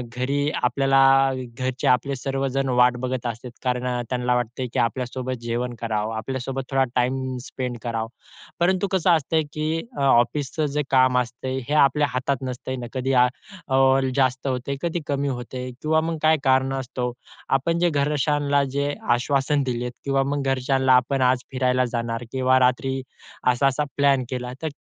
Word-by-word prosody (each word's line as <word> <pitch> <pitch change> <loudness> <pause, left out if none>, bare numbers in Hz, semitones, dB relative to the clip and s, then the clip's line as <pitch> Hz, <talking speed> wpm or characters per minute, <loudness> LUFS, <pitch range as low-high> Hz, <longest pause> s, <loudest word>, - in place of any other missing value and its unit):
घरी 140 +3 0
आपल्याला 135 +1 +4 0.3
घरचे 130 -1 -2
आपले 130 +3 +2
सर्वजण 135 0 -2
वाट 125 0 +4
बघत 125 -1 -3
असतात. 120 +2 -6
कारण 125 0 -1 0.2
त्यांना 125 -1 0
वाटतं, 120 +1 -2
की 130 - 0
आपल्यासोबत 125 +2 -2
जेवण 120 +1 -2
करावं. 110 -1 -2
आपल्यासोबत 130 +2 -4
थोडा 135 0 +3
टाईम 130 +1 0
स्पेंड 125 -2 -4
करावा. 115 -2 -2 0.5
परंतु 185 +3 +2
कसं 185 -1 +2
असतंय 160 0 +2
की 155 +2 -1 0.2
अ, - - -2
ऑफिसचं 135 +4 +2
जे 150 - +1
काम 130 -1 +4
असतंय, 125 +2 -3
हे 150 - 0
आपल्या 145 +1 +1
हातात 130 +1 -1
नसतं 130 +1 -5
ना. 120 - -5
कधी 130 +1 -1
आ - - +4 0.9
जास्त 130 0 +1
होतंय, 130 +1 -2
कधी 170 0 -1
कमी 140 0 -1
होतंय 125 0 -4
किंवा 160 +1 +2
मग 165 0 -2
काय 155 0 +4
कारणास्तव 130 -2 0 0.5
आपण 165 +5 -1
जे 175 - +3
घरच्यांना 145 -1 +1
जे 140 +1 0 0.2
आश्वासन 140 +2 +1
दिलंय 125 -1 -2 0.2
किंवा 135 0 +2
मग 140 0 -2
घरच्यांना 130 0 +2
आपण 130 +2 +2
आज 130 0 +3
फिरायला 130 -1 +1
जाणार 115 0 -2
किंवा 130 0 +3
रात्री 130 +1 +1 0.5
असा-असा 135 +2 +1
प्लॅन 140 -2 +3
केला 125 -1 -4
तर 160 - -2
130 Hz, 155 wpm, -23 LUFS, 125-140 Hz, 0.9 s, आपल्याला